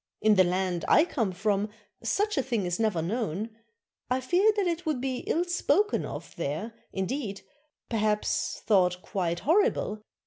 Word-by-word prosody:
In 215 0 +4
the 190 -2 +6
land 180 -1 0
I 310 - +6
come 225 - -1
from 200 +2 0 0.3
such 415 +1 0
a 270 - +2
thing 235 -7 -1
is 175 +2 -2
never 210 -8 +1
known; 215 +1 -2 0.6
I 255 +1 +2
fear 355 +11 +3
that 405 - +2
it 345 0 -1
would 305 -5 -1
be 260 0 -2
ill 340 - +2
spoken 375 +4 +1
of - - -8
there, 165 +8 -3 0.2
indeed, 195 +1 -3 0.5
per 230 - -2
haps, 210 0 0
'thought 180 -3 +3
quite 175 -3 -2
horrible. 305 - +2
215 Hz, 165 wpm, -28 LUFS, 185-285 Hz, 0.6 s, the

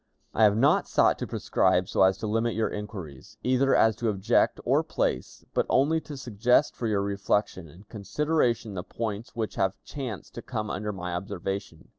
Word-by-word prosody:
"I 110 - +5
have 105 0 +4
not - - +3
sought - - +3
to - - -3
prescribe 90 +1 +1
so - - 0
as 95 0 +5
to 105 - -5
limit 115 +2 0
your 110 0 0
inquiries, 95 -10 -8
either 130 +2 +3
as 110 -1 +4
to 115 0 0
object 100 -2 +2
or - - +3
place, - - -2
but - - +1
only 155 +5 +3
to 145 -3 -9
suggest 125 +2 +2
for 115 - -3
your 100 -2 +1
reflection 100 -2 -1
and 90 +7 -16
consideration 115 - 0
the 90 - -3
points 110 +3 -5
which 110 -2 -2
have 95 -1 +1
chanced 125 - -6
to - - -7
come 110 -1 -4
under 105 +2 -3
my 90 -3 -5
observation. 95 0 -5
105 Hz, 185 wpm, -27 LUFS, 95-115 Hz, -, I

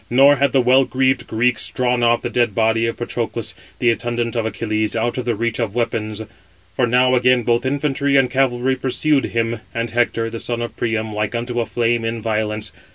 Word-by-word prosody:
Nor 140 +4 +5
had 140 0 +2
the 135 - +3
well 130 +2 +4
greaved 130 0 0
Greeks 110 -3 +1
drawn 125 +4 0
off 120 0 +2
the - - -2
dead 120 -2 +1
body 115 0 +2
of 115 - -3
Patroclus, - - -4 0.2
the 120 - +3
attendant 120 0 -2
of 115 -1 0
Achilles, 110 -1 -2
out 120 +3 -1
of 125 - -4
the 120 -2 0
reach 115 +3 -2
of 115 -3 -2
weapons; 110 -2 -2 0.5
for 125 - +2
now 125 +2 +3
again 125 0 +3
both 120 +2 +1
infantry 140 0 0
and 135 -2 +5
cavalry 130 0 +1
pursued 135 +3 +1
him, 115 0 -2 0.2
and 115 0 -2
Hector, 115 -1 0
the 115 - -5
son 120 0 -3
of 120 - -6
Priam, 110 -2 -2
like 105 +2 -2
unto 120 +1 -2
a 115 - -3
flame 120 -1 0
in 115 0 -2
violence. 105 -1 -2
120 Hz, 205 wpm, -19 LUFS, 115-125 Hz, 0.5 s, Nor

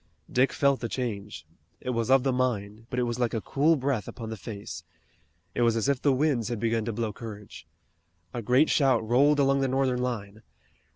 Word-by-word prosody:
Dick 130 +2 +3
felt 140 -1 +2
the 115 - -4
change. 105 -9 -4 0.3
It 125 - -3
was 115 -1 -1
of 135 -1 +5
the 135 -1 +1
mind, 115 -3 -2
but 125 - -4
it 125 - +2
was 120 0 -2
like 120 -1 0
a - - 0
cool 150 +8 +2
breath 135 -6 -1
upon 115 -2 -7
the - - -3
face. 100 -6 -8 0.7
It - - -1
was 115 -1 +3
as 115 +3 0
if 140 -2 +1
the 145 - +3
winds 130 -4 +1
had 120 -2 -3
begun 115 0 0
to 115 - -1
blow 110 -1 -3
courage. 105 -2 -10 0.7
A 120 - -3
great 125 +7 +3
shout 130 -6 +3
rolled 140 +5 +4
along 135 0 +3
the 135 - +2
Northern 130 -1 +1
line. 110 -4 -4
120 Hz, 210 wpm, -27 LUFS, 110-135 Hz, 0.7 s, of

